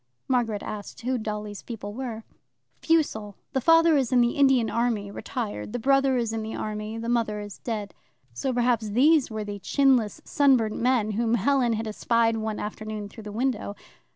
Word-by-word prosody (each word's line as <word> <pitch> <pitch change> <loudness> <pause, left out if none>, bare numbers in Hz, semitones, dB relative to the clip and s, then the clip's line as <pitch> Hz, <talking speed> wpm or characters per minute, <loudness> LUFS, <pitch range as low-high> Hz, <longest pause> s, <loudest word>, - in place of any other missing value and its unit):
Margaret 230 -5 0
asked 210 +2 -7
who 250 +1 -1
Dolly's 210 -1 -5
people 205 -3 -7
were. 230 -2 -5 0.6
"Fussell. 220 -11 +1 0.2
The 265 - +1
father 330 +2 +5
is 265 -3 0
in 250 - +4
the 240 0 +3
Indian 270 -5 +3
army 230 -4 -1
retired; 210 -1 -5
the - - -1
brother 270 +1 +3
is 230 -2 -1
in 225 - -2
the 220 0 -5
army. 215 +1 -4
The 230 0 -5
mother 230 -3 0
is 205 -1 -8
dead." 210 -4 -4 0.4
So 260 - -2
perhaps 240 -3 +1
these 280 +6 +4
were 220 -1 -4
the 205 -1 -6
"chinless 255 -1 +2
sunburnt 255 -7 +3
men" 240 -3 +2
whom 230 +2 +1
Helen 245 +2 +2
had 220 +1 -2
espied 230 +1 +1
one 220 -1 -3
afternoon 215 0 -5
through 220 +1 -12
the 210 - -6
window. 225 -2 -2
230 Hz, 180 wpm, -26 LUFS, 215-255 Hz, 0.6 s, father